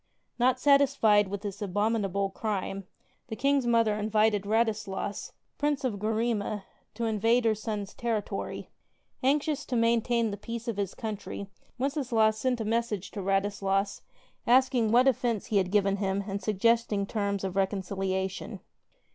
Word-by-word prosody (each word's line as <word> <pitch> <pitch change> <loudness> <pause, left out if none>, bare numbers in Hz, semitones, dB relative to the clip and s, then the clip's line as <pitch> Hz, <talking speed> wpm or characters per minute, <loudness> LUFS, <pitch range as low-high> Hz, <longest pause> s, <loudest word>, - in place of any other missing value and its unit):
Not 255 +1 +3
satisfied 275 -8 +4
with 200 +1 -5
this 205 0 -5
abominable 200 -1 0
crime, 195 -2 -3 0.4
the 225 - -5
King's 275 0 +1
mother 230 -2 +3
invited 210 -1 +1
Radislas, 215 -3 -1 0.3
Prince 290 -1 0
of 225 -6 -1
Gurima, 215 -1 -1 0.3
to 235 - -2
invade 225 +2 +2
her 225 - +4
son's 210 -2 -4
territory. 225 -3 -3 0.5
Anxious 290 +2 +1
to 255 - -3
maintain 230 0 +2
the 200 - -5
peace 230 +3 -6
of 230 -3 -2
his 200 -2 -2
country, 210 -3 -5 0.3
Wenceslaus 245 -6 +1
sent 255 -1 0
a 220 - -2
message 225 -3 -1
to 205 - -5
Radislas 195 0 0 0.5
asking 245 -2 +4
what 250 +3 +5
offense 235 -4 +1
he 210 - 0
had 185 -2 +2
given 200 0 +2
him 195 0 -1
and 200 0 -3
suggesting 215 0 +1
terms 200 -2 -2
of 190 -2 -2
reconcilia 190 -1 -1
tion. 190 - -8
215 Hz, 145 wpm, -28 LUFS, 200-235 Hz, 0.5 s, what